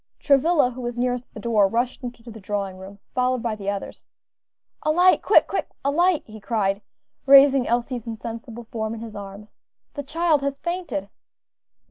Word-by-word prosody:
Travilla, 285 -1 +3
who 255 +1 -8
was 240 0 -4
nearest 250 0 -2
the - - -6
door, 215 -2 +3
rushed 240 +5 -2
into 240 -1 -8
the 220 - -10
drawing 195 -2 -3
room, 195 +1 -10 0.2
followed 250 -1 0
by 230 -2 -1
the 200 -2 -4
others. 200 -1 -6 0.7
"A - - -1
light! 360 +4 +5
quick, - - +5
quick, - - -3 0.2
a 280 - +3
light!" 345 +2 +2
he 220 0 -11
cried, 200 -2 -1 0.5
raising 275 -1 +7
Elsie's 240 0 -1
insensible 230 +1 -7
form 220 -1 -3
in 225 - -8
his 225 -2 -8
arms; 200 +1 -10 0.3
"the 285 - -4
child 320 +1 +1
has 280 0 -2
fainted." 340 - -4
240 Hz, 170 wpm, -23 LUFS, 215-275 Hz, 0.7 s, raising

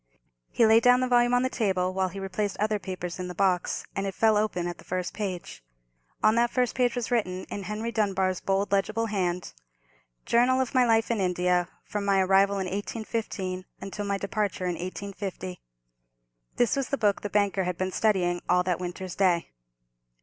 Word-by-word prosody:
He 230 - +3
laid 220 +1 +6
down 250 +1 +5
the 255 - +1
volume 240 0 +4
on 245 - +3
the - - +2
table 190 -7 0
while 190 0 +1
he 195 +2 -7
replaced 195 +1 -2
other 215 0 0
papers 180 -2 -5
in 180 - -3
the 180 - -7
box, 185 -1 +1
and 195 0 -1
it 190 - -4
fell 220 -1 +4
open 210 -4 0
at 175 0 -5
the - - -13
first 180 -2 -3
page. 185 - -5 0.6
On 215 - +6
that 235 +1 +3
first 250 -1 0
page 245 -1 +1
was 245 0 -3
written, 185 -6 0
in 205 - -4
Henry 210 +4 -4
Dunbar's 190 -4 0
bold, 195 +1 0
legible 200 +3 +1
hand— 180 -4 -2 0.7
"Journal 250 +2 +3
of 260 -1 -1
my 255 -2 +4
life 225 0 +3
in 230 - 0
India, 180 -1 +1 0.2
from 205 -1 -4
my 200 -1 +3
arrival 195 +1 +4
in 195 -1 -1
1815 200 -2 -4
until 195 +2 -5
my 200 0 0
departure 200 -1 -2
in 180 - 0
1850." 185 - -6 0.9
This 240 -3 +2
was 275 -2 -2
the 275 - 0
book 205 -4 +1
the 205 - -4
banker 200 -2 +1
had 180 -1 -2
been 185 0 -1
studying 180 -5 +1
all 180 0 +4
that 180 -1 -1
winter's 180 0 -5
day. 180 -3 +1
195 Hz, 195 wpm, -27 LUFS, 185-220 Hz, 0.9 s, laid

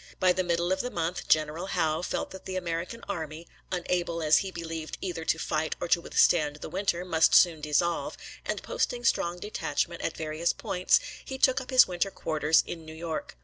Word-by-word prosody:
By 185 -1 +4
the 185 - 0
middle 175 0 0
of 190 - +1
the 250 - -3
month 175 -2 -3
General 155 +4 +1
Howe 160 -3 0
felt - - -3
that 190 - -10
the 190 - -4
American 175 +4 -3
army, 160 -3 -5 0.2
unable 175 -2 -1
as 155 0 +5
he 195 - -3
believed 165 -3 -6
either 175 -4 -4
to 160 - +2
fight 155 -1 -1
or 175 - -3
to 170 - +4
withstand 150 -3 +3
the 150 - -8
winter, 185 -2 -1
must 165 -3 +4
soon 165 -4 +5
dissolve, 160 +3 0 0.3
and, - - -3
posting 250 - -1
strong 175 -5 +1
detachments 175 -3 -2
at - - -2
various 155 +2 -1
points, 180 0 +2 0.2
he 265 - -6
took 260 -1 +3
up 255 - -11
his 255 -1 +7
winter 180 +1 -1
quarters 155 -3 +2
in 165 -2 -7
New 160 0 -10
York. 160 - -5
170 Hz, 195 wpm, -28 LUFS, 160-185 Hz, 0.3 s, his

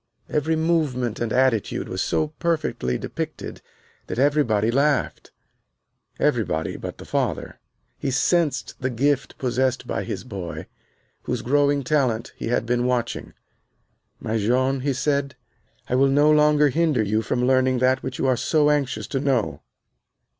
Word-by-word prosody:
Every 155 +2 +1
movement 150 -8 0
and 120 -2 -2
attitude 125 -4 +1
was - - -3
so 155 - 0
perfectly 155 - -1
depicted - - -6 0.5
that - - -5
everybody 125 -6 +2
laughed 140 -1 0 0.9
everybody 80 +1 0
but - - -7
the - - -11
father. - - -2 0.4
He 140 - -2
sensed 150 +1 +1
the 130 - 0
gift 140 +3 0
possessed 130 0 0
by 100 - -2
his - - -5
boy, 95 -8 -6 0.6
whose - - -3
growing 145 +1 +2
talent 125 -5 0
he - - -5
had 115 -1 0
been 120 +1 +1
watching. 120 -2 -2 0.8
"My 110 +1 -2
Jean," 130 +5 +1
he 140 +1 0
said, 140 +1 -1 0.5
"I - - -3
will 135 +2 +4
no 145 +2 +4
longer 150 -1 +4
hinder 150 -4 +2
you 110 +2 +1
from 125 +2 -1
learning 130 0 +3
that 130 +1 +2
which 130 -1 -5
you - - -1
are 130 -1 +3
so 150 +4 +2
anxious 135 -7 -1
to 135 - -2
know." 130 -5 0
130 Hz, 145 wpm, -23 LUFS, 120-145 Hz, 0.9 s, will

